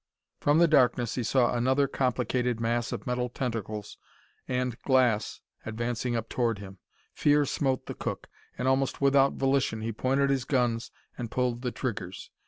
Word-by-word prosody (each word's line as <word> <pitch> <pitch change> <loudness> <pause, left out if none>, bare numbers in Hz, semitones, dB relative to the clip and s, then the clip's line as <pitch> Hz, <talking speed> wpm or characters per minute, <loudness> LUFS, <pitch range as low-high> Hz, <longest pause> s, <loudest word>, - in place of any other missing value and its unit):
From 145 +1 +3
the 170 +1 +6
darkness 125 -5 +3
he 125 - -2
saw 120 +1 +2
another 130 +3 +2
complicated 125 -2 0
mass 115 0 0
of - - -5
metal 125 0 -1
tentacles 110 -4 -4 0.5
and 125 -2 -1
glass 125 -5 +2 0.2
advancing 120 +2 -2
up 115 -1 -2
towards 115 -4 0
him. 95 -1 -10 0.3
Fear 145 0 +3
smote 135 -1 -1
the - - -5
cook, - - -5 0.3
and 125 - -1
almost 130 0 +1
without 140 0 +4
volition 135 -5 +1
be 115 +1 -2
pointed 135 +5 +1
his 135 -2 +1
guns 120 -3 0 0.3
and 120 -2 -4
pulled 125 -1 -1
the 125 - -1
triggers. 100 -9 -5
125 Hz, 160 wpm, -28 LUFS, 115-135 Hz, 0.5 s, the